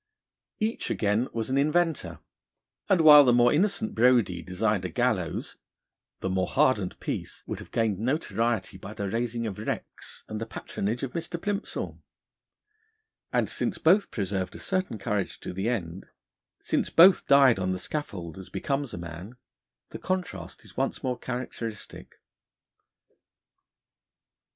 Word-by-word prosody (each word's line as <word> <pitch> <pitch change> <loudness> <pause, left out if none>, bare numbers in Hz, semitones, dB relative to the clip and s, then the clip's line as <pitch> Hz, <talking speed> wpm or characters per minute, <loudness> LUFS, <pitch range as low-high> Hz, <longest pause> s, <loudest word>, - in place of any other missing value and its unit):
Each, 220 +2 -1
again, 105 +4 +1
was 115 +2 -3
an 135 - +2
inventor, 150 - 0 0.7
and 185 -3 +4
while 150 -2 +10
the 125 - +4
more 120 0 +5
innocent 210 +6 +1
Brodie 120 - +3
designed 95 +3 -1
a 90 - -3
gallows, 95 -4 -1 0.6
the - - -2
more 95 0 0
hardened 130 -10 +1
Peace - - -5
would - - -5
have - - -11
gained 110 -4 0
notoriety 115 - -1
by 100 +3 -9
the 100 -1 -3
raising 115 +2 -2
of 105 -4 -5
wrecks - - -6
and 110 0 -5
the 115 - -4
patronage 110 +3 -4
of 135 - -3
Mr. 170 0 -4
Plimsoll. 205 +3 -4 1.3
And - - +1
since - - -2
both 190 +6 +4
preserved 95 -3 -3
a - - -8
certain 185 - -2
courage 100 -1 -2
to - - -6
the 95 +5 -1
end, 95 -6 -4 0.5
since - - -1
both 180 +2 +6
died 135 -6 +6
on 95 0 0
the 95 - -1
scaffold 95 - -5
as 95 - -10
becomes 140 -3 -2
a - - -7
man, 85 +6 -8 0.5
the - - -8
contrast 180 - -4
is - - -15
once - - -2
more 125 -1 -2
characteristic. 120 -4 -6
115 Hz, 145 wpm, -27 LUFS, 95-140 Hz, 1.3 s, while